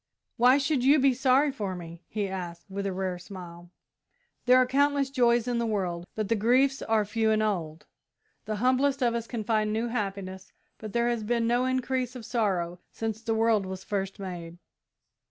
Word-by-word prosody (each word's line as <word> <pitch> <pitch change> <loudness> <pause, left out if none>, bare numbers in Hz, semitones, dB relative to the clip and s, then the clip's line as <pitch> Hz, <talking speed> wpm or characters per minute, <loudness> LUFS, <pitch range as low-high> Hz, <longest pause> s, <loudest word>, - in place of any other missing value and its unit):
"Why 250 +3 +5
should 275 -2 0
you 280 +3 +6
be 270 -1 +4
sorry 270 +3 +3
for 205 -8 -4
me?" 170 -1 -9
he 205 -2 -2
asked, 175 -3 -6
with 200 +1 -3
a - - -1
rare 185 -1 -3
smile. 175 -2 -10 0.8
"There 250 +1 +7
are 255 - +5
countless 280 +1 +2
joys 240 -3 +3
in 240 -1 0
the 235 - 0
world, 180 -5 -2
but 215 -2 -2
the 230 - +2
griefs 255 +6 +3
are 220 -1 +1
few 220 +2 0
and 215 0 +2
old. 165 -7 -2 0.6
The 215 - -2
humblest 260 +4 +2
of 240 -1 +2
us 235 -1 -3
can 230 -3 -4
find 215 -1 +1
new 225 +2 -1
happiness, 195 -4 -4 0.3
but 215 -2 -8
there 235 0 +2
has 235 -2 -1
been 230 +2 0
no 240 +2 +2
increase 255 -1 -1
of 240 -3 -8
sorrow 185 -7 -1
since 220 -1 -4
the 225 -1 -1
world 220 -3 +2
was 190 0 -6
first 195 -1 -3
made. 175 -3 -7
220 Hz, 190 wpm, -28 LUFS, 190-250 Hz, 0.8 s, There